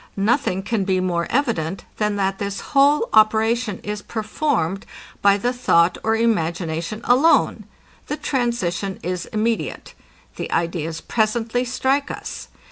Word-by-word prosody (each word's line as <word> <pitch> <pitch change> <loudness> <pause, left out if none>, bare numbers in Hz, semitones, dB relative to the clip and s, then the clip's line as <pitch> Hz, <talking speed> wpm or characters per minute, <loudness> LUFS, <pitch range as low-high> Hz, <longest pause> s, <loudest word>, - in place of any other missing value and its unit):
Nothing 195 -2 +1
can 220 -1 -1
be 190 -1 +1
more 175 -2 -1
evident, 195 - -1
than 210 -1 0
that 195 -1 -1
this 200 -1 -3
whole 285 +10 +4
operation 220 0 +3
is 210 0 -4
performed 215 - -1 0.4
by 200 0 +5
the 245 +5 -1
thought 170 -8 +3
or 220 0 +2
imagination 175 -3 -1
alone. 270 +7 +3 0.4
The 295 - -3
transition 220 - -1
is 180 -1 -3
immediate. 220 +1 -2 0.4
The - - -5
ideas 165 -1 -2
presently 230 +2 0
strike 265 +3 0
us. - - -6
215 Hz, 125 wpm, -21 LUFS, 185-240 Hz, 0.4 s, by